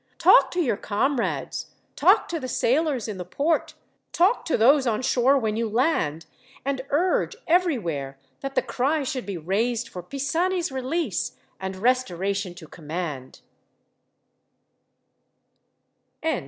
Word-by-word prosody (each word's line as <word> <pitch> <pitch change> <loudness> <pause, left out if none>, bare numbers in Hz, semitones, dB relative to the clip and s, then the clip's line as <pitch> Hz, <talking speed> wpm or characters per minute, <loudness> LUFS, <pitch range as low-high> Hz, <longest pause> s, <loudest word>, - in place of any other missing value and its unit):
Talk - - +6
to 360 - -1
your 250 - +1
comrades, 235 +5 -1 0.3
talk - - +4
to 335 - -2
the 260 - -5
sailors 260 0 +1
in 210 -3 -5
the - - -3
port, 290 - -1 0.4
talk 370 +8 +2
to 325 - +1
those 265 +4 +5
on 225 +1 0
shore 265 +1 +3
when 220 -4 -1
you 230 0 -1
land, 210 - 0 0.4
and 275 -1 -1
urge, 355 +9 +1
everywhere, 190 - 0 0.2
that 275 0 -5
the - - +2
cry 270 +5 0
should 255 -3 -4
be 195 -3 -3
raised 225 +8 -1
for 180 - -7
Pisani's 325 - -1
release, 265 - -2 0.3
and 190 0 -4
restoration 200 -4 0
to 170 -3 -11
command." 155 -5 -6
245 Hz, 125 wpm, -25 LUFS, 190-285 Hz, 0.4 s, Talk